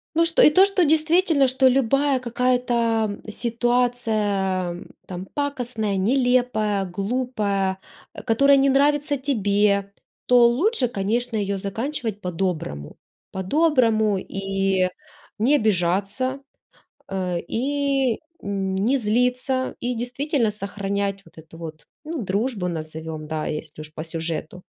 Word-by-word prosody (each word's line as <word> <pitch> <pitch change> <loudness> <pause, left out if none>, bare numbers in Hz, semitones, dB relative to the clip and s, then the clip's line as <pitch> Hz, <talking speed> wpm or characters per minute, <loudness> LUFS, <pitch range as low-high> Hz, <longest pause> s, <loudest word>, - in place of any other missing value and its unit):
Ну 335 +1 +4
что, 330 0 +3
и - - +7
то 370 +5 +6
что 395 -3 +2
действительно, 315 -1 +3
что 260 +1 +3
любая 270 +2 +2
какая-то 235 -3 0
ситуация, 215 -6 0 0.2
там, 180 0 -6
пакостная, 245 -7 -2
нелепая, 235 -2 +1
глупая, 200 -1 -1 0.3
а, - - -8
которая 275 +4 +4
не 275 0 +4
нравится 290 +1 +2
тебе, 205 -6 +1 0.4
то 245 -1 +6
лучше, 270 - +1
конечно, 230 +3 -1
ее 200 -1 -1
заканчивать 220 +2 -4
по-доброму. 170 - -3 0.3
По-доброму, 220 - +2
и 195 -1 -1 0.5
не 260 +7 +4
обижаться, 205 +5 0 0.7
э, 185 -2 -2
и 270 +2 0 0.2
не 200 +5 0
злиться, 250 +3 0
и 245 +1 -1
действительно 245 0 -1
сохранять 200 -1 -2
вот 165 - -21
эту 160 +1 -13
вот, 160 -2 -9 0.2
ну, 315 -2 -4
дружбу 200 0 -1
назовем, 155 -1 -6
да, 155 0 -3
если 155 0 -6
уж 155 0 -11
по 155 - -6
сюжету. 165 +1 -4
220 Hz, 115 wpm, -23 LUFS, 190-260 Hz, 0.7 s, и